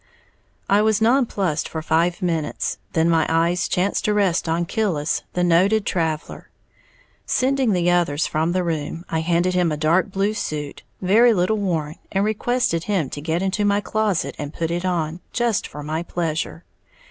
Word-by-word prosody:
I 200 +1 +4
was 215 0 +2
non 240 +3 +3
plussed 175 -8 -1
for 160 -1 -5
five 170 +4 +1
minutes; 165 -4 -2
then 160 0 +2
my 165 -1 +3
eyes 170 +2 +1
chanced 185 +3 0
to 210 - +2
rest 190 -5 +1
on 170 +1 0
Killis, 180 -7 -1
the 180 - 0
noted 190 +5 +3
traveller. 160 -4 -2 0.8
Sending 265 -2 +1
the 175 -1 +2
others 165 -4 +1
from 160 +2 0
the 180 0 0
room, 165 +1 -3
I 160 - +1
handed 175 +2 +1
him 180 -2 +2
a 150 - -2
dark 165 +5 +2
blue 195 +2 0
suit, 150 -8 -4 0.2
very 225 +5 +5
little 185 +4 +1
worn, 165 -6 -2
and 195 +1 +1
requested 215 -5 0
him 190 -10 -1
to 145 - -6
get 165 +4 -1
into 195 +2 0
my 205 0 +3
closet 210 -3 -1
and 145 -1 -4
put 165 0 -2
it 175 +2 -2
on, 170 -2 -1
just 235 -3 0
for 150 - -9
my 155 +2 -2
pleasure. 165 -1 -3
175 Hz, 175 wpm, -22 LUFS, 160-205 Hz, 0.8 s, very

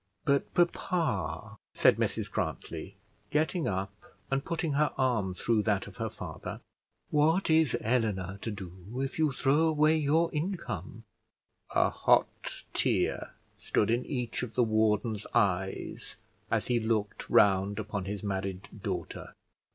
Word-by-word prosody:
"But, 140 0 +2
papa," 170 - 0 0.2
said - - +5
Mrs - - -1
Grantly, - - -4 0.3
getting 155 +3 +1
up, 95 0 -2 0.4
and 135 0 +1
putting 165 -2 -2
her 150 +1 +2
arm 115 -8 +1
through 115 +3 +1
that 100 -2 +1
of - - -12
her - - -2
father, - - -7 0.5
"what 160 +4 +3
is 160 -5 +4
Eleanor 105 -5 0
to 115 - -3
do 95 -5 -6 0.2
if 135 +3 -3
you 155 -2 +3
throw 145 +4 +3
away 155 0 +4
your 155 +3 +2
income?" 150 - -4 0.7
A - - +4
hot - - +1
tear - - 0 0.3
stood 105 - +1
in 120 +2 +1
each 125 -5 -2
of 120 -3 -5
the 125 - +4
warden's 110 -1 +1
eyes 95 -1 0 0.3
as - - +1
he 120 -1 +2
looked 110 -2 -1
round 100 0 +4
upon 100 -3 -3
his 100 0 -4
married 95 -1 -3
daughter. - - -4
115 Hz, 135 wpm, -30 LUFS, 100-150 Hz, 0.7 s, said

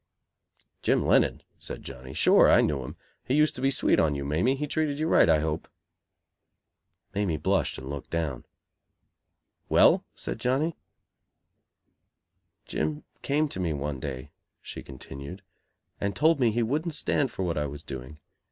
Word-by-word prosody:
"Jim - - +2
Lennon?" - - +3 0.2
said - - -8
Johnny, 65 -1 -9
"Sure, - - +5
I - - +6
knew 75 -3 0
him. - - -8 0.3
He 130 - 0
used 150 +1 +4
to 125 - -7
be 135 - +3
sweet 135 - +2
on 75 -3 +2
you, 70 0 -4
Mamie. 85 - +1
He 145 +2 -2
treated 150 -1 -1
you 155 +2 0
right, 165 - +5
I 80 - +6
hope." 80 0 -2 1.5
Mamie 100 -5 0
blushed - - 0
and 65 - -8
looked 70 0 -6
down. 80 -6 -2 1.3
"Well?" - - +5
said - - -5
Johnny. 145 +6 0 1.9
"Jim 75 -1 -2 0.2
came 150 +2 +1
to 95 - -5
me 85 -4 0
one 70 -1 -3
day," 70 0 -6 0.3
she - - -8
continued, 70 +7 -9 0.6
"and 100 0 -2
told 160 0 +3
me 120 -3 +4
he 115 +2 0
wouldn't 155 +7 -1
stand 140 -2 0
for 95 - -4
what 85 -2 -1
I 75 - -1
was 70 +2 -8
doing. 65 0 -8
85 Hz, 160 wpm, -27 LUFS, -, 1.9 s, I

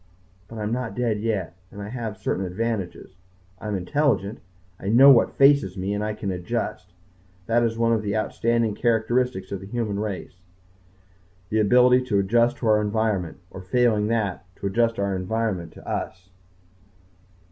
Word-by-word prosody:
But 115 - -10
I 110 - -4
am 105 - -2
not 125 -1 -3
dead 115 -4 0
yet. 100 -5 -2
And 100 - -11
I 100 0 -6
have 115 -3 -5
certain 95 0 -2
advantages. 95 -1 -4 0.4
I - - -7
am 105 - -1
intelligent. 110 +1 0 0.4
I 95 - -7
know 130 +6 +8
what 120 - +4
faces 135 -9 +4
me. 95 +2 -2
And 105 +1 -2
I 105 0 -2
can 100 -2 -3
adjust. 90 -1 -4 0.5
That 115 +3 +2
is 115 -1 0
one 115 0 +2
of 110 - +1
the 105 0 -2
outstanding 115 0 0
characteristics 120 -2 0
of 100 - -3
the 95 - -10
human 105 -2 -2
race 100 -3 -5 1.1
the 110 - +1
ability 125 +4 +5
to 110 -5 0
adjust 115 +5 +2
to 115 - -3
our 105 -1 +4
environment, 105 -5 -1
or, 95 - -8
failing 110 +1 +2
that, 105 -5 -1
to - - -8
adjust 115 +3 +1
our 100 -1 -1
environment 95 -3 -2
to - - -14
us. 95 0 -5
110 Hz, 170 wpm, -24 LUFS, 95-115 Hz, 1.1 s, know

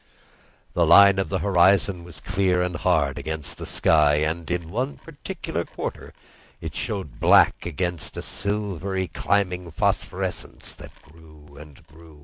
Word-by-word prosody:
The 85 -2 +2
line 100 +3 +7
of 95 -5 -1
the - - 0
horizon 95 -1 +3
was 85 -3 -12
clear 95 -2 0
and 90 0 -1
hard 80 -7 +1
against 80 -2 -5
the - - -6
sky, 75 -2 +3
and 80 +2 -2
in 85 -2 -3
one 130 +6 -2
particular 160 - -6
quarter - - -7 0.5
it - - -6
showed 95 - -4
black - - +4
against 85 0 -4
a - - -4
silvery 100 -2 -2
climbing 90 -3 -1
phosphorescence 80 - -3
that - - -13
grew 75 -2 -18
and 75 -2 -14
grew. 80 -1 -17
85 Hz, 140 wpm, -24 LUFS, 80-95 Hz, 0.5 s, line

